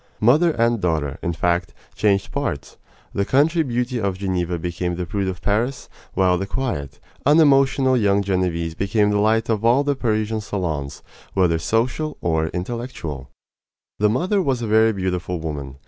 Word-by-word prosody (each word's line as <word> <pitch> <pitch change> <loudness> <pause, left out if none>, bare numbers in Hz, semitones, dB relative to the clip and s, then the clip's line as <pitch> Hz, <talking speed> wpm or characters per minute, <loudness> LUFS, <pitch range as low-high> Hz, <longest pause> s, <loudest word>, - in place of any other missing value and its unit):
Mother 145 +10 +4
and 115 -6 +1
daughter, 75 -5 -1
in 85 - -1
fact, 85 +1 -1 0.2
changed 100 -2 +1
parts. - - -4 0.4
The 100 - 0
country 150 - +3
beauty 125 -3 -1
of 100 -2 -1
Geneva 90 -3 -1
became 90 +1 -3
the 90 0 -3
prude 100 +3 -2
of 90 -1 -5
Paris, 120 +6 -1 0.3
while 90 -2 +3
the 100 - -3
quiet, 115 - -3 0.2
unemotional 135 -3 +4
young 100 -4 +2
Genevese 90 -4 -1
became 105 +3 +1
the 105 - +1
light 110 +2 +2
of 110 -2 0
all 120 +5 +4
the 145 0 0
Parisian 110 -3 -1
salons, 80 -9 -4 0.3
whether 90 -4 +2
social 125 - -1
or 80 -1 0
intellectual. 90 - -5 0.7
The 105 0 +3
mother 185 - +1
was 130 -8 -1
a - - -2
very 110 +1 +4
beautiful 90 -3 -2
woman. 75 -4 -5
100 Hz, 160 wpm, -21 LUFS, 90-120 Hz, 0.7 s, Mother